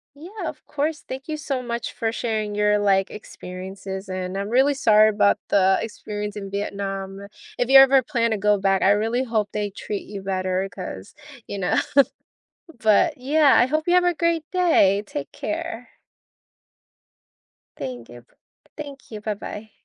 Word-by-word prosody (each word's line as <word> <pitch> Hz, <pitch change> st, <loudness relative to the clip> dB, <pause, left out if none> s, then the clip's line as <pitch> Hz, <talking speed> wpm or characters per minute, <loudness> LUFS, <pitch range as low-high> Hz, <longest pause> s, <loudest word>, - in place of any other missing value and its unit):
Yeah, 355 Hz, +4 st, -7 dB
of 305 Hz, -, -12 dB
course, 300 Hz, +1 st, -2 dB
thank 265 Hz, +3 st, -7 dB
you 305 Hz, -, -2 dB
so 275 Hz, -3 st, -3 dB
much 235 Hz, -1 st, -4 dB
for 225 Hz, -1 st, -2 dB
sharing 220 Hz, -3 st, -2 dB
your, 210 Hz, 0 st, +2 dB
like, 195 Hz, -2 st, +2 dB
experiences, 190 Hz, 0 st, -8 dB
and 185 Hz, 0 st, -4 dB
I'm 200 Hz, +1 st, -3 dB
really 265 Hz, +5 st, +4 dB
sorry 215 Hz, -6 st, +5 dB
about 205 Hz, -1 st, +3 dB
the 190 Hz, -1 st, +4 dB
experience 210 Hz, -1 st, -5 dB
in 195 Hz, -2 st, -7 dB
Vietnam. 195 Hz, -1 st, -4 dB, 0.4 s
If 245 Hz, -, 0 dB
you 270 Hz, 0 st, +10 dB
ever 270 Hz, 0 st, +7 dB
plan 235 Hz, -4 st, 0 dB
to 220 Hz, -, +1 dB
go 210 Hz, +1 st, +3 dB
back, 195 Hz, -1 st, +2 dB
I -, -, +4 dB
really 225 Hz, +5 st, +1 dB
hope 220 Hz, -4 st, -1 dB
they 210 Hz, -1 st, -2 dB
treat 200 Hz, +1 st, -6 dB
you 200 Hz, -2 st, -7 dB
better 185 Hz, 0 st, -1 dB
'cause, 180 Hz, -, -8 dB, 0.3 s
you 200 Hz, -, -5 dB
know 180 Hz, -, 0 dB, 1.1 s
but, 240 Hz, +8 st, +3 dB
yeah. 285 Hz, +2 st, +4 dB
I 245 Hz, -, +5 dB
hope 310 Hz, +3 st, -1 dB
you 350 Hz, -, +4 dB
have 360 Hz, 0 st, +5 dB
a 355 Hz, -1 st, +2 dB
great 335 Hz, -1 st, 0 dB
day, 320 Hz, -, +3 dB
take 145 Hz, -8 st, -6 dB
care. -, -, -5 dB, 1.9 s
Thank 125 Hz, -3 st, -6 dB
you, 120 Hz, 0 st, -12 dB
b -, -, -32 dB, 0.5 s
thank 285 Hz, -4 st, -9 dB
you, 215 Hz, -1 st, -7 dB
bye-bye. 215 Hz, 0 st, -6 dB
210 Hz, 165 wpm, -23 LUFS, 195-270 Hz, 1.9 s, you